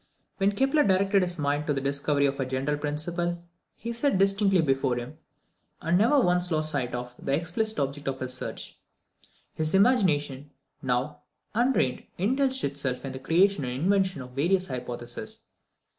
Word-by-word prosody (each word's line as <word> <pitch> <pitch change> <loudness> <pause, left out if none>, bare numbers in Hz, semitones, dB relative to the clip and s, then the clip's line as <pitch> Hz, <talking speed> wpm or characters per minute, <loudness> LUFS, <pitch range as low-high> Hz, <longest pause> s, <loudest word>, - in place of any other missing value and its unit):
When 200 0 +2
Kepler 270 +7 +3
directed 195 0 +3
his 175 -1 -2
mind 145 0 -1
to 145 - +1
the - - 0
discovery 140 +1 +1
of 140 0 -1
a 135 - 0
general 135 +3 -1
principle, 170 +4 -3 0.3
he 235 +1 -5
set 235 -2 +1
distinctly 195 -1 +3
before 135 -3 +1
him, 125 +6 -7 0.6
and 165 +2 0
never 235 +10 +4
once 180 -5 +2
lost 155 -2 +2
sight 125 -4 -2
of, 125 0 -6
the 135 - -1
explicit 195 +8 -2
object 140 +1 -3
of 135 -1 -2
his 130 -1 -3
search. 130 - -5 0.7
His 155 +2 0
imagination, 150 - +2 0.3
now 130 +3 -1 0.3
unreined, 230 - +1
indulged 260 +7 +1
itself 140 -2 -2
in 135 - -4
the 130 - -7
creation 175 +4 +2
and 125 0 -3
invention 190 -6 +1
of 125 - -12
various 175 +8 +1
hypotheses. 120 -4 -5
155 Hz, 160 wpm, -27 LUFS, 135-195 Hz, 0.7 s, never